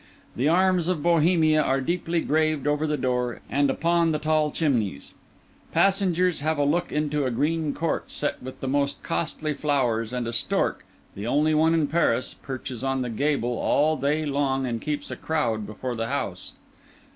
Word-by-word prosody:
The 130 +5 +1
arms 180 0 +3
of 175 -5 -1
Bohemia 160 -2 +4
are 135 -2 +1
deeply 170 +3 -1
graved 155 -2 +1
over 150 +1 +1
the 150 0 0
door 125 -2 -1
and 140 0 +2
upon 170 +3 +2
the 155 - +1
tall 155 0 +1
chimneys; 120 - -1 0.6
passengers 185 -3 +2
have 155 +2 0
a 145 - +2
look 170 +5 0
into 150 -1 0
a - - +1
green 150 +4 0
court 165 0 -2
set 145 - -2
with 130 +1 -9
the 135 - -3
most 140 +1 0
costly 155 -2 -2
flowers, 125 -6 0
and 125 -1 -2
a 115 - -3
stork, 115 - 0 0.3
the 100 +3 -6
only 150 +5 +2
one 160 +2 +3
in 160 -2 +2
Paris, 140 -6 +1
perches 130 -2 -6
on 135 -1 0
the 120 - -4
gable 125 -1 0
all 155 +2 +2
day 150 +2 0
long 135 -2 0
and 115 -3 -3
keeps 145 -1 -3
a - - -3
crowd 115 -10 -1
before 120 +4 -5
the 115 -1 -3
house. 100 -9 -3
145 Hz, 180 wpm, -25 LUFS, 130-160 Hz, 0.6 s, Bohemia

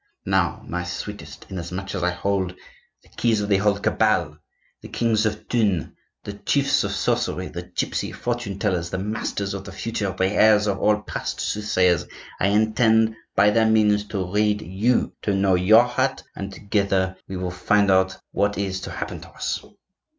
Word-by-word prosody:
Now, - - +1
my 90 0 -3
sweetest, 90 +4 -7
inasmuch 95 +1 -5
as 95 - -3
I 90 - +2
hold 95 0 -1 0.5
the - - -23
keys 115 -3 +2
of 105 0 -2
the 100 - +4
whole 100 0 +2
cabal,—the 100 -7 -2
kings 110 -2 +1
of 105 0 -4
Thune, 105 -8 0 0.3
the 105 - -6
chiefs 140 +7 +1
of 100 - -2
sorcery, 110 -3 -1
the 85 - -6
gypsy 90 - -2
fortune 120 -5 -3
tellers, 90 -5 -1
the 95 - -3
masters 100 0 -3
of 100 - -5
the 100 - -8
future, 100 0 -3
the 95 - +2
heirs 105 +2 +4
of 100 -2 -1
all 105 0 +2
past - - -4
soothsayers,—I 95 -3 0
intend 110 +2 +3 0.2
by 105 +2 +5
their 110 +1 +3
means 105 -2 +3
to 95 -3 -2
read 105 +2 +1
you, 105 +8 0
to 100 - 0
know 95 -1 +3
your 100 +6 +6
heart; 130 +2 -1
and, 100 0 -5
together, 100 -2 0
we 95 - -5
will 90 -1 -3
find 100 +3 +2
out 95 0 +2
what 105 0 0
is 95 -1 -2
to - - -6
happen - - -5
to - - -12
us." - - -3
100 Hz, 170 wpm, -23 LUFS, 95-110 Hz, 0.5 s, your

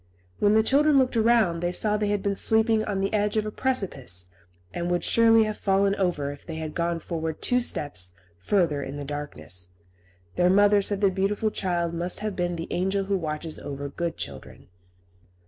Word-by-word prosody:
When 205 +1 +3
the 220 - +5
children 290 +4 +4
looked 255 -2 +2
around 225 -7 +3
they 175 +1 -1
saw 210 +3 +1
they 210 0 0
had 205 -1 -1
been 200 - 0
sleeping 220 +1 +3
on 195 -2 -2
the 195 - -1
edge 210 0 +1
of 215 - +1
a 215 - -4
precipice, 140 - -2 0.4
and 175 0 -3
would 175 0 0
surely 225 -1 +5
have 215 -1 -4
fallen 195 0 +2
over 175 -8 -1
if 145 - -11
they 165 - -7
had 160 -1 -5
gone 170 0 -1
forward 160 -1 -4
two 250 0 +2
steps 95 - -3 0.3
further 150 - +1
in 140 +1 -6
the 145 - -5
darkness. 145 -11 -6 0.7
Their 180 0 +4
mother 205 +1 +5
said 200 0 0
the 200 -2 +4
beautiful 200 +3 0
child 175 -4 -1
must 175 +3 -1
have 210 -2 -3
been 175 -1 -1
the 165 0 -5
angel 190 +2 0
who 195 +1 -1
watches 155 -2 -4
over 140 0 -6
good 170 +3 -4
children. 70 +4 -9
190 Hz, 195 wpm, -25 LUFS, 160-210 Hz, 0.7 s, the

